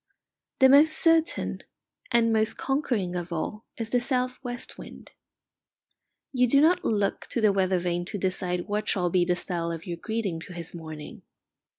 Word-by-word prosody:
The 265 Hz, -, +7 dB
most 300 Hz, +4 st, +6 dB
certain 330 Hz, -1 st, +2 dB, 0.5 s
and 230 Hz, -1 st, +3 dB
most 220 Hz, 0 st, +1 dB
conquering 240 Hz, -10 st, -1 dB
of 175 Hz, 0 st, -4 dB
all 210 Hz, +6 st, -4 dB
is 225 Hz, -1 st, -4 dB
the 245 Hz, -, +2 dB
south 250 Hz, 0 st, -1 dB
west 245 Hz, -2 st, -6 dB
wind. -, -, -11 dB, 1.2 s
You 250 Hz, -1 st, +3 dB
do 275 Hz, +4 st, +4 dB
not 345 Hz, +4 st, +4 dB
look 205 Hz, -2 st, 0 dB
to -, -, -2 dB
the 215 Hz, -3 st, +4 dB
weather 190 Hz, -1 st, +2 dB
vane 175 Hz, 0 st, -2 dB
to 205 Hz, -, -5 dB
decide 180 Hz, -2 st, -2 dB
what 210 Hz, 0 st, -2 dB
shall 180 Hz, -3 st, +1 dB
be 180 Hz, -1 st, +3 dB
the 180 Hz, 0 st, +1 dB
style 170 Hz, -2 st, -3 dB
of 165 Hz, 0 st, -6 dB
your 175 Hz, -2 st, -4 dB
greeting 215 Hz, -4 st, -3 dB
to 165 Hz, +2 st, -10 dB
his 170 Hz, -1 st, -6 dB
morning. 160 Hz, -3 st, -9 dB
205 Hz, 175 wpm, -27 LUFS, 175-245 Hz, 1.2 s, The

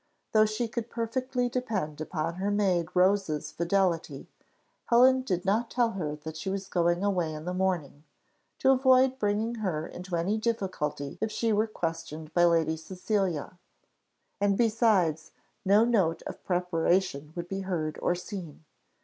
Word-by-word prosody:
Though 215 Hz, 0 st, +5 dB
she 215 Hz, +2 st, -2 dB
could 235 Hz, 0 st, -4 dB
perfectly 245 Hz, +2 st, -1 dB
depend 210 Hz, -, -3 dB
upon 165 Hz, +1 st, -3 dB
her 195 Hz, +2 st, -1 dB
maid 190 Hz, -5 st, +1 dB
Rose's 180 Hz, -5 st, +2 dB
fidelity, 170 Hz, -5 st, 0 dB, 0.6 s
Helen 260 Hz, +2 st, +5 dB
did 185 Hz, -8 st, -2 dB
not 220 Hz, +4 st, +1 dB
tell 240 Hz, -2 st, +1 dB
her 155 Hz, -7 st, -3 dB
that 155 Hz, +1 st, -8 dB
she 160 Hz, +4 st, -4 dB
was 195 Hz, 0 st, -3 dB
going 175 Hz, 0 st, +1 dB
away 180 Hz, -5 st, +1 dB
in 155 Hz, +1 st, -8 dB
the 180 Hz, -, -2 dB
morning, 180 Hz, -6 st, -1 dB, 0.5 s
to 265 Hz, -, +4 dB
avoid 260 Hz, 0 st, +4 dB
bringing 210 Hz, +2 st, 0 dB
her 160 Hz, -6 st, -1 dB
into 180 Hz, +1 st, -6 dB
any 190 Hz, +6 st, 0 dB
difficulty 185 Hz, -11 st, -2 dB
if 220 Hz, -, -1 dB
she 225 Hz, +1 st, 0 dB
were 215 Hz, +2 st, +2 dB
questioned 165 Hz, -5 st, -5 dB
by 175 Hz, 0 st, +5 dB
Lady 165 Hz, -2 st, +2 dB
Cecilia; 180 Hz, 0 st, -2 dB, 0.8 s
and 200 Hz, -1 st, +2 dB
besides, 210 Hz, -9 st, +2 dB, 0.3 s
no 205 Hz, +3 st, +5 dB
note 195 Hz, -9 st, +1 dB
of -, -, -8 dB
preparation 175 Hz, -4 st, 0 dB
would 170 Hz, 0 st, -5 dB
be 195 Hz, +1 st, -3 dB
heard 170 Hz, -5 st, -3 dB
or 175 Hz, -, +1 dB
seen. 175 Hz, -4 st, -8 dB
190 Hz, 150 wpm, -28 LUFS, 165-215 Hz, 0.8 s, Though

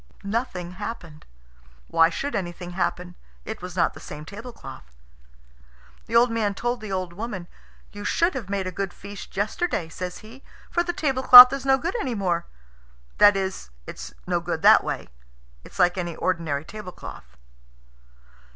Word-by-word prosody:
Nothing 200 Hz, -4 st, -3 dB
happened. 185 Hz, -6 st, -8 dB, 0.6 s
Why 165 Hz, 0 st, +4 dB
should 280 Hz, +11 st, -4 dB
anything 175 Hz, -2 st, -5 dB
happen? 180 Hz, 0 st, -3 dB, 0.3 s
It 220 Hz, -3 st, -6 dB
was 180 Hz, -1 st, -8 dB
not 170 Hz, -2 st, +1 dB
the -, -, -12 dB
same 150 Hz, +1 st, -9 dB
tablecloth. 200 Hz, -, -11 dB, 1.1 s
The 230 Hz, -, -4 dB
old 235 Hz, +1 st, +5 dB
man 215 Hz, -3 st, -1 dB
told 240 Hz, +2 st, -2 dB
the 215 Hz, -2 st, -7 dB
old 185 Hz, -2 st, -3 dB
woman. 195 Hz, -3 st, -6 dB, 0.4 s
"You 205 Hz, 0 st, -9 dB
should 340 Hz, -, +1 dB
have 230 Hz, -7 st, -6 dB
made 195 Hz, -1 st, -2 dB
a 185 Hz, -, -3 dB
good 190 Hz, 0 st, -4 dB
feast 200 Hz, -1 st, -10 dB
yesterday," 210 Hz, -, -1 dB
says 180 Hz, +2 st, -6 dB
he, 240 Hz, +5 st, -13 dB, 0.3 s
"for 345 Hz, -, +1 dB
the 350 Hz, 0 st, -2 dB
tablecloth 260 Hz, -4 st, +9 dB
is 275 Hz, 0 st, -4 dB
no 270 Hz, 0 st, +5 dB
good 335 Hz, -, -3 dB
any 250 Hz, -3 st, -3 dB
more. 175 Hz, -4 st, -1 dB, 0.7 s
That 205 Hz, -1 st, +7 dB
is, 190 Hz, -, -4 dB, 0.2 s
it's -, -, -8 dB
no -, -, 0 dB
good -, -, -4 dB
that -, -, +7 dB
way; -, -, -4 dB, 0.6 s
it's -, -, -14 dB
like 180 Hz, 0 st, +3 dB
any 175 Hz, -2 st, -4 dB
ordinary 160 Hz, -5 st, -2 dB
tablecloth." 185 Hz, -, -10 dB
200 Hz, 160 wpm, -24 LUFS, 175-235 Hz, 1.1 s, tablecloth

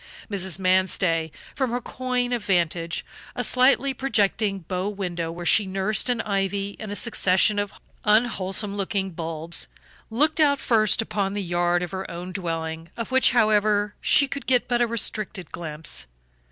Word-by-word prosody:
Mrs. 190 Hz, -3 st, -2 dB
Manstey, 185 Hz, -3 st, +1 dB, 0.2 s
from 265 Hz, -3 st, -1 dB
her 245 Hz, +1 st, -1 dB
coign 250 Hz, 0 st, -2 dB
of 235 Hz, -3 st, -2 dB
vantage 170 Hz, -3 st, 0 dB, 0.3 s
(a -, -, -2 dB
slightly 265 Hz, +2 st, +3 dB
projecting 215 Hz, -5 st, 0 dB
bow 185 Hz, +4 st, -3 dB
window 175 Hz, -5 st, -4 dB
where 175 Hz, +1 st, -7 dB
she 205 Hz, +4 st, +4 dB
nursed 195 Hz, +5 st, 0 dB
an 240 Hz, -2 st, +1 dB
ivy 200 Hz, 0 st, -2 dB
and 215 Hz, -2 st, -6 dB
a -, -, -3 dB
succession 205 Hz, -2 st, +3 dB
of 205 Hz, -1 st, -4 dB, 0.2 s
unwholesome 210 Hz, -2 st, +2 dB
looking 195 Hz, -1 st, -2 dB
bulbs), 165 Hz, -, -2 dB, 0.4 s
looked 295 Hz, +8 st, +1 dB
out 285 Hz, -2 st, +4 dB
first 225 Hz, -1 st, +2 dB
upon 200 Hz, -2 st, -2 dB
the 205 Hz, -, -2 dB
yard 175 Hz, 0 st, +1 dB
of 180 Hz, -, -5 dB
her 190 Hz, 0 st, -5 dB
own 175 Hz, +2 st, -6 dB
dwelling, 165 Hz, -3 st, -4 dB
of 230 Hz, +2 st, -4 dB
which, 260 Hz, 0 st, +5 dB
however, 210 Hz, -3 st, +2 dB
she 280 Hz, -, +4 dB
could 280 Hz, +1 st, -6 dB
get 250 Hz, -2 st, +2 dB
but 240 Hz, -1 st, +1 dB
a 240 Hz, -, +3 dB
restricted 215 Hz, -5 st, -2 dB
glimpse. 155 Hz, -, -4 dB
200 Hz, 160 wpm, -24 LUFS, 175-225 Hz, 0.4 s, which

